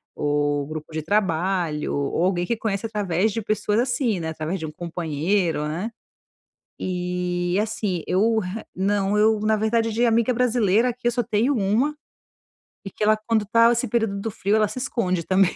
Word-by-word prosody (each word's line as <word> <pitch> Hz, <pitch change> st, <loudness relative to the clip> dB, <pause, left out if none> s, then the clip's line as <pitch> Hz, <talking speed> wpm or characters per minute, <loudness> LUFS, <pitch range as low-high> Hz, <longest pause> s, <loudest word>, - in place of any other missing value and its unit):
ou 145 Hz, -1 st, 0 dB
grupo 155 Hz, +1 st, -7 dB
de 155 Hz, -, -2 dB
trabalho, 175 Hz, -4 st, 0 dB
ou 140 Hz, +4 st, -1 dB
alguém 180 Hz, -1 st, +1 dB
que 235 Hz, -, 0 dB
conhece 210 Hz, -1 st, -2 dB
através 205 Hz, -1 st, 0 dB
de 225 Hz, -, -2 dB
pessoas, 210 Hz, 0 st, 0 dB
assim, 245 Hz, -4 st, 0 dB
né, 160 Hz, -, -3 dB
através 160 Hz, +4 st, -3 dB
de -, -, -3 dB
um 155 Hz, -, -6 dB
companheiro, 165 Hz, 0 st, -1 dB
né. 180 Hz, +9 st, -3 dB, 0.9 s
E, 180 Hz, 0 st, -2 dB
assim, 210 Hz, -5 st, -2 dB
eu 220 Hz, +4 st, +2 dB
re 195 Hz, +3 st, -4 dB
eu -, -, -18 dB
não 195 Hz, +1 st, +1 dB
Eu, 215 Hz, 0 st, +4 dB
na 215 Hz, 0 st, +2 dB
verdade, 225 Hz, +1 st, +1 dB
de 240 Hz, +2 st, +2 dB
amiga 235 Hz, +2 st, +2 dB
brasileira 235 Hz, -2 st, +2 dB
aqui, 245 Hz, +1 st, -7 dB
eu 240 Hz, -, +3 dB
só 245 Hz, -, 0 dB
tenho 225 Hz, +6 st, +1 dB
uma, 230 Hz, +9 st, +1 dB, 0.9 s
e 195 Hz, -, -6 dB
que -, -, -16 dB
ela, 215 Hz, +1 st, +5 dB
quando 215 Hz, -1 st, 0 dB
tá 230 Hz, +2 st, +5 dB
esse 235 Hz, -, 0 dB
período 220 Hz, -3 st, 0 dB
do 225 Hz, -, -3 dB
frio, 210 Hz, -1 st, 0 dB
ela 215 Hz, -1 st, +3 dB
se 255 Hz, -, -8 dB
esconde 185 Hz, -9 st, -1 dB
também, 185 Hz, -1 st, +3 dB
200 Hz, 185 wpm, -23 LUFS, 175-225 Hz, 0.9 s, ela